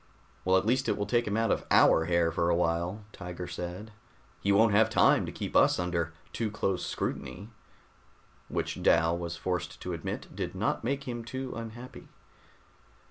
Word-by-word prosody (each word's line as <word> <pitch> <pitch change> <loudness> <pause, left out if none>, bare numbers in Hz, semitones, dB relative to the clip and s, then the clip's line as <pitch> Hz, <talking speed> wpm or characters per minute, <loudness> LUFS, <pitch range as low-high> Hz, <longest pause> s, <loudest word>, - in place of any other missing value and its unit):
"Well, 95 0 +4
at 95 - 0
least 130 +4 +1
it 105 - +1
will 100 - -1
take 120 +2 +1
him 105 +1 0
out 115 0 +2
of - - 0
our 80 - +5
hair 85 -1 +2
for 85 +1 +1
a 85 - +3
while," 85 +4 0
Tiger 90 0 -6
said. 90 +5 -6 0.5
"He 100 - +1
won't 110 +2 +5
have 110 +2 +5
time 110 - +4
to - - -4
keep - - -6
us - - +5
under 85 -2 -1 0.2
too 115 -2 -1
close 95 -3 -1
scrutiny." 100 +5 -4 1.0
Which, - - -3
Dal 80 +1 +4
was 85 -1 -4
forced 90 +1 -3
to 90 - -4
admit, 85 - -5
did - - -4
not - - -1
make 140 +4 -1
him 120 -1 -4
too 130 +2 -5
unhappy. 115 +2 -8
95 Hz, 180 wpm, -29 LUFS, 85-115 Hz, 1.0 s, our